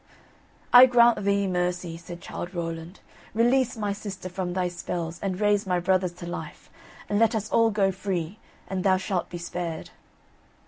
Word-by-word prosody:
"I 250 +1 +11
grant 235 -3 +4
thee 200 0 +2
mercy," 180 -2 -1
said 170 +1 -10
Childe 180 +2 -7
Rowland, 165 +1 -5 0.3
"release 245 +2 +2
my 205 -2 -1
sister 195 -2 -7
from 180 0 -3
thy 185 -1 0
spells 175 -1 -4
and 190 -2 -3
raise 205 -1 +2
my 180 -1 +1
brothers 185 0 +1
to 175 0 -9
life, 175 +1 -7 0.4
and 205 - 0
let 225 0 +3
us 215 0 -3
all 230 0 +4
go 200 -3 +2
free, 185 -1 -4 0.3
and 190 -1 -3
thou 190 -1 +4
shalt 185 -1 -2
be 175 - -6
spared." 170 -1 -5
185 Hz, 170 wpm, -26 LUFS, 175-205 Hz, 0.4 s, I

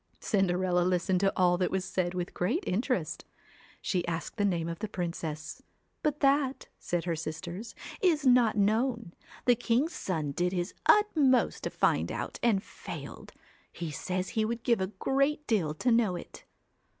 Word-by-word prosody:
Cinderella 185 -3 +1
listened 180 +1 +1
to 195 +1 +3
all 180 -1 +3
that 185 - +1
was 190 -1 -1
said 180 -1 -1
with 180 -1 -3
great 250 - 0
interest; 190 - -1 0.6
she 180 -3 -1
asked 170 +4 -4
the 205 - +2
name 170 -4 0
of 170 0 -5
the 215 - -3
princess. 170 -5 -4 0.4
But 300 -2 -1
that 275 -1 +2
said 175 -1 -2
her 170 -1 -1
sisters 170 +7 -6 0.3
'is 320 -6 +3
not 245 -4 +5
known; 225 -1 +1 0.3
the 245 - +6
king's 245 +7 +1
son 155 -6 -2
did 180 +5 0
his 175 0 -2
utmost 305 - +4
to - - 0
find - - +1
it - - -4
out - - -5
and 215 -5 +2
failed. - - -9 0.4
He 170 -3 -5
says 185 +5 -3
he 220 -3 0
would 230 +1 -2
give 235 -5 +2
a 190 - 0
great 275 +9 0
deal 195 - +1
to 245 +10 +1
know 225 -6 +3
it.' 175 - -10
195 Hz, 170 wpm, -30 LUFS, 175-245 Hz, 0.6 s, the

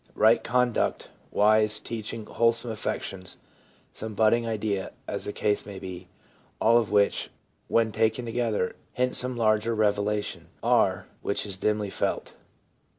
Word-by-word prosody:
right 110 +2 +5
conduct, 125 -1 +1 0.2
wise 110 0 +3
teaching, 110 -1 -5
wholesome 115 +1 +1
affections, 95 -3 -4 0.6
some 110 -1 -6
budding 115 +2 +3
idea, 105 -3 -2
as - - -3
the - - -2
case 105 0 0
may 100 -2 -8
be 90 -1 -8 0.3
— - - -34
all 115 +2 +5
of 115 - -2
which, 100 0 +2 0.4
when 115 -1 +2
taken 110 +3 +1
together, 115 -5 -1 0.2
hint 125 0 0
some 125 -1 0
larger 110 0 +2
revela 105 -1 +1
tion, - - -7 0.2
r, - - +3 0.2
which 100 - -1
is 100 -2 -5
dimly 105 +1 0
felt. - - -2
110 Hz, 145 wpm, -27 LUFS, 105-115 Hz, 0.6 s, right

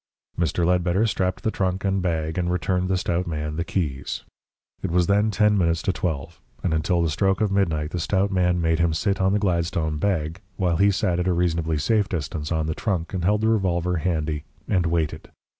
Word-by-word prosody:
Mr. 85 0 0
Ledbetter 90 +3 +2
strapped 95 -4 -1
the 110 - +1
trunk 95 -1 -1
and 95 0 +1
bag, 80 -3 -1
and 90 -1 0
returned 90 0 0
the 95 - +2
stout 90 -2 -1
man 75 -2 -3
the 85 - -1
keys. 75 -8 -3 0.6
It - - -2
was 90 +1 +3
then 105 +3 +3
ten 105 0 +3
minutes 85 -2 +1
to 95 - +1
twelve, 80 -2 -4 0.2
and 90 - +1
until 85 +2 +1
the 85 - +1
stroke 95 +6 +1
of 105 -2 +1
midnight 80 -6 0
the 90 - -2
stout 95 +4 +1
man 90 -2 +2
made 80 0 +1
him 85 -2 +2
sit 100 +3 0
on 95 0 +3
the 105 - +3
Gladstone 85 -5 0
bag, 85 -2 -1 0.2
while 90 -3 +1
he 100 +3 +5
sat 90 -3 +1
at 90 - 0
a 90 - +3
reasonably 85 -2 0
safe 105 +6 +1
distance 75 -2 -3
on 80 -1 0
the 80 - -1
trunk 90 -3 -2
and 90 -3 -2
held 105 +3 +2
the 110 - +2
revolver 90 -4 +1
handy 80 -3 -1 0.2
and 90 -4 +1
waited. 80 -2 -1
90 Hz, 210 wpm, -24 LUFS, 80-95 Hz, 0.6 s, he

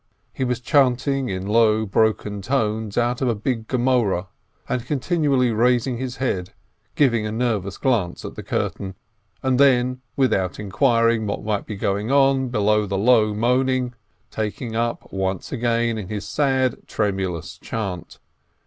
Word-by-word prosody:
He - - -2
was 125 -1 -1
chanting 135 0 +2
in 95 0 -3
low, 110 +1 +3
broken 105 0 0
tones 110 -3 -1
out 120 +1 +1
of 130 - +1
a 115 - +1
big 110 +1 -3
Gemoreh, 120 -8 +1 0.4
and 125 - -1
continually 140 -2 +1
raising 120 +2 +2
his 130 -1 -4
head, 95 -10 -2 0.4
giving 120 -7 +2
a - - -4
nervous 110 -5 -1
glance 110 -10 0
at - - -6
the - - -7
curtain, 95 -1 -3 0.5
and 130 -1 +1
then, 130 -2 +3
without 95 -9 +1
inquiring 115 +1 +2
what 100 - -3
might 105 -2 -2
be 110 - -5
going 100 +3 -1
on 135 -2 +3
beyond 105 -2 +1
the 100 - -1
low 110 0 +4
moaning, 125 +2 +1 0.4
taking 110 +2 -4
up 115 +1 -2
once 95 -1 -2
again 115 -1 0
his 105 0 -5
sad, 130 -4 0
tremulous 95 -5 -2
chant. 95 -6 -5
115 Hz, 145 wpm, -22 LUFS, 105-130 Hz, 0.5 s, low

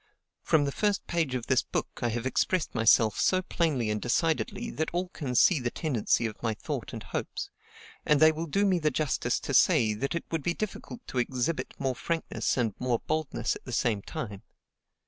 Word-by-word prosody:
From 150 -2 +3
the 140 - -1
first 205 +5 0
page 160 -6 -1
of 120 -2 -3
this 130 - +3
book, - - -4
I 120 - +1
have 120 +2 -3
expressed 165 +6 0
myself 115 -1 +4
so 185 0 +3
plainly 145 - 0
and 105 -1 -2
decidedly 170 - 0
that 160 - -2
all 180 +1 -1
can 140 -8 -4
see 155 +6 +5
the 120 -1 -1
tendency 120 -5 0
of 110 -2 -5
my 115 -2 -1
thought - - -5
and - - -7
hopes; - - -4 0.5
and 150 -1 +3
they 155 +1 +7
will 160 +2 -4
do 200 +7 +1
me 185 -3 +3
the 155 -2 +2
justice 140 -5 0
to 140 - -4
say, 130 - +4
that 140 +9 -2
it 170 - -3
would 165 -2 -1
be 170 +4 -1
difficult 215 +3 -6
to 130 - -3
exhibit 130 +3 -1
more 135 -2 -1
frankness 165 +4 -2
and 115 -5 +1
more 125 -2 +1
boldness 155 -2 -1
at - - -11
the 130 - -7
same 115 -4 +1
time. 105 -7 -6
140 Hz, 205 wpm, -28 LUFS, 120-165 Hz, 0.5 s, they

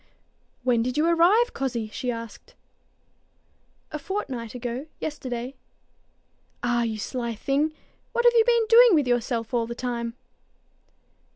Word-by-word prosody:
"When 245 -2 +3
did 250 +4 -2
you 305 - +3
arrive, 360 +9 +4
cozzie?" 240 -5 -2
she 250 - -3
asked. 230 -2 -7 1.4
"A 305 - -4
fortnight 260 - -4
ago 250 +4 -4
yesterday." 255 -4 -4 1.1
"Ah, 245 -1 +1
you 225 -2 -1
sly 235 +1 -3
thing! 280 +7 0 0.4
What 475 - 0
have 480 - +7
you 455 - +7
been 470 -1 +3
doing 465 -2 +8
with 295 -3 +3
yourself 240 -1 -1
all 235 -1 +1
the 235 - -5
time?" 235 -2 -3
250 Hz, 130 wpm, -25 LUFS, 235-315 Hz, 1.4 s, doing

